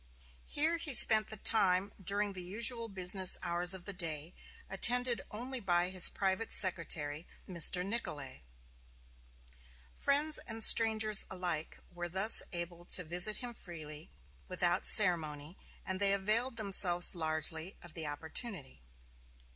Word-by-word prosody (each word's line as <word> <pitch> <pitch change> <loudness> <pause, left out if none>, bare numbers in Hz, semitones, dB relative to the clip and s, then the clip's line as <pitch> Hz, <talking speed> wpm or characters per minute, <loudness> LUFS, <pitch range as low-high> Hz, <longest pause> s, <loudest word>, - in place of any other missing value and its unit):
Here 315 +3 -2
he 305 -5 0
spent 215 -2 +6
the 215 - -5
time 195 -2 0
during 200 +2 -3
the 185 - -6
usual 230 +5 0
business 185 -1 +1
hours 175 +1 +1
of 180 -2 -8
the 200 - -5
day, 165 -2 -2 0.3
attended 240 +3 +2
only 250 +5 -5
by 175 -4 -1
his 185 -2 +4
private 195 +3 -4
secretary, 165 -4 -2 0.2
Mr. 180 0 +3
Nicolay. 150 - -6 1.5
Friends 295 +2 -1
and 225 0 -5
strangers 220 -2 +5
alike 175 -4 -6 0.2
were 175 0 -8
thus 190 +5 +6
able 170 -1 -6
to 180 - +2
visit 175 +5 -1
him 240 -1 -8
freely 155 -6 -8
and 70 -2 -31
without 175 +1 -2
ceremony 160 -5 +1 0.3
and 190 0 -5
they 200 -1 +3
availed 220 +6 -1
themselves 190 -4 +3
largely 160 +1 -2
of 175 -3 -14
the 160 -2 -7
opportunity. 160 - -5
185 Hz, 130 wpm, -31 LUFS, 170-215 Hz, 1.5 s, spent